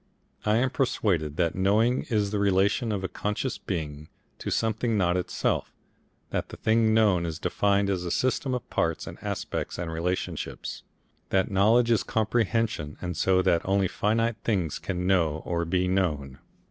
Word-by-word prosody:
I 105 +1 +4
am 130 +2 +2
persuaded 85 - 0
that 85 -2 +1
knowing 105 +6 +2
is 105 -4 +1
the 105 - 0
relation 100 +4 +2
of 100 -2 -2
a - - 0
conscious 105 +7 -3
being 75 -4 -5 0.3
to - - -4
something 110 0 0
not 90 -2 +2
itself, 90 - -1 0.6
that - - -2
the - - -9
thing 110 0 +3
known 105 -6 +4
is 80 -2 -3
defined 100 +3 +1
as 95 -3 -1
a 90 - -3
system 130 +5 0
of 125 - -5
parts - - 0
and - - -9
aspects - - -3
and 85 -2 -3
relationships, 90 +3 -3 0.5
that 95 0 +1
knowledge 115 +5 +4
is 115 - +4
comprehension, 110 -7 0
and 90 -1 -4
so 95 +3 +3
that 85 -2 +3
only 95 0 +2
finite 115 +4 0
things 90 -9 0
can 90 -2 -3
know 85 -5 +2
or 85 -1 -1
be 90 +2 +1
known. 75 -8 -1
95 Hz, 165 wpm, -27 LUFS, 90-110 Hz, 0.6 s, I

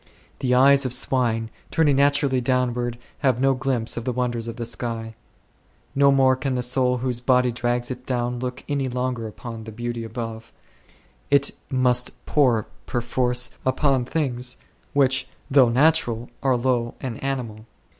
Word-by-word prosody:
The 125 -1 +1
eyes 140 +2 +6
of 130 -1 0
swine, 115 -3 +1 0.2
turning 150 -4 +3
naturally 140 -2 +3
downward, 120 -1 0 0.2
have 130 -4 +2
no 135 +1 +3
glimpse 130 -3 -1
of 115 - -3
the 125 - -1
wonders 120 -2 -2
of 115 - -5
the 120 - -4
sky; 115 -1 -4 0.8
no 140 0 +5
more 135 -1 +4
can 130 0 -2
the 125 - -1
soul 125 0 +2
whose 125 -1 -1
body 125 0 +3
drags 120 +1 -1
it 125 0 -6
down 125 -1 -1
look 125 0 -5
any 140 -2 -1
longer 125 -2 -2
upon 115 0 -8
the 110 - -8
beauty 120 +1 -4
above; 115 0 -6 0.8
it 140 0 +4 0.2
must 125 -1 0
pore 125 -8 +2 0.2
perforce 125 +1 0
upon 130 0 +2
things 125 -4 -2 0.4
which 135 -2 +2 0.2
though 135 -3 +6
natural 120 -3 +2
are 130 -2 +2
low 120 -1 0
and 125 -3 -6
animal. 115 -5 -4
125 Hz, 155 wpm, -23 LUFS, 120-130 Hz, 0.8 s, eyes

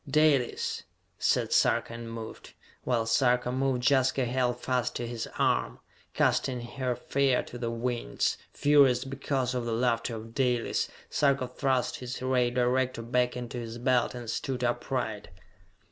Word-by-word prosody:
"Dalis!" 145 -4 +2 0.4
said - - +1
Sarka, - - +2
and 115 0 -7
moved. 115 -1 -8 0.3
While 120 -3 +1
Sarka 125 +1 +2
moved, 130 -1 0
Jaska 130 -1 +3
held 125 0 0
fast 125 -1 -1
to 120 - -3
his 115 -1 -5
arm. - - +1 0.4
Casting 125 -2 +1
her 125 +1 -3
fear 135 +1 +1
to 120 - -9
the 120 -1 -2
winds, 120 +1 -1
furious 135 -3 +4
because 135 -1 -2
of 125 -1 -1
the 115 - -1
laughter 115 0 0
of 115 +1 -9
Dalis, 125 -3 +1 0.2
Sarka 140 -3 +2
thrust 130 0 0
his 125 -1 -6
ray 130 -1 +2
director 125 0 0
back 125 +1 0
into 120 0 -5
his 115 0 -6
belt 125 0 +1
and 120 -1 -7
stood 125 +2 -3
upright. 120 -3 -2
125 Hz, 145 wpm, -29 LUFS, 120-130 Hz, 0.4 s, furious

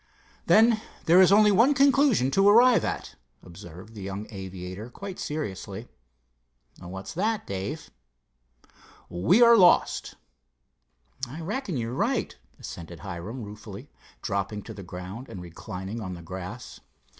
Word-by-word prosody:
"Then 220 0 +5 0.2
there 175 +3 +6
is 185 - +6
only 210 +1 +6
one 235 +9 +4
conclusion 275 - +4
to 195 +6 +4
arrive 240 +3 +6
at," - - -4 0.3
observed 90 +4 -12
the 105 - -9
young 100 +2 -5
aviator 95 +2 -7
quite 195 +8 -8
seriously. 110 -7 -5 0.9
"What's 95 +2 -8
that, 215 +5 -1
Dave?" 95 0 -5 1.2
"We 110 - +4
are 235 0 +8
lost." 180 -5 +3 1.1
"I 140 +7 -8
reckon 200 - -3
you're 115 0 -3
right," - - -1 0.2
assented 85 -1 -9
Hiram 100 +6 -6
ruefully, 105 -1 -10 0.3
dropping 100 +1 -3
to 110 - -9
the 100 - -9
ground 90 +7 -8
and 95 - -8
reclining 95 +5 -7
on 95 -3 -5
the 85 - -11
grass. 95 +7 -8
110 Hz, 130 wpm, -26 LUFS, -, 1.2 s, are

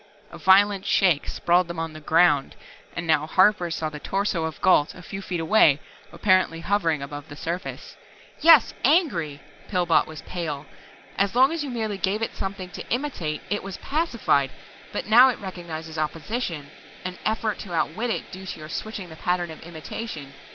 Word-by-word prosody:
A - - -10
violent 195 0 +5
shake 175 -7 +3
sprawled 175 +1 +2
them 170 0 -6
on 165 -1 -3
the 155 - -9
"ground" 155 -2 +3 0.4
and 170 - -3
now 155 -2 +2
Harper 185 0 +4
saw 160 -1 -2
the 150 -1 -7
torso 195 -2 -1
of 160 - -5
Gault, 150 -5 +3
a 180 - -12
few 195 +3 -6
feet 180 -3 -3
away, 160 -4 +5 0.3
apparently 185 -4 +2
hovering 165 -6 0
above 145 +1 -8
the 145 - -8
surface. 170 +5 -5 0.4
"Yes, 315 -5 +7
angry!" 185 - +2 0.3
Pillbot 175 -4 +2
was 160 -1 -9
pale. 155 -5 -4 0.5
"As 200 +2 +1
long 260 +3 +6
as 330 -2 -2
you 285 - -4
merely 220 -5 -3
gave 205 +4 0
it - - -3
something 195 -1 -5
to - - -8
imitate 235 - -2
it 205 - 0
was 195 -1 -7
pacified. 235 - +1 0.4
But - - -3
now 240 +5 +7
it 250 - -2
recognizes 165 -4 -7
opposition, 160 - -3 0.3
an 185 0 -5
effort 215 -1 -1
to 185 -4 -7
outwit 220 +9 -1
it - - -3
due 190 0 -9
to - - -6
your 155 0 -9
switching 205 -1 -5
the 160 - -10
pattern 175 -1 -1
of 160 - -11
imitation. 160 -2 -7
180 Hz, 180 wpm, -25 LUFS, 160-210 Hz, 0.5 s, Yes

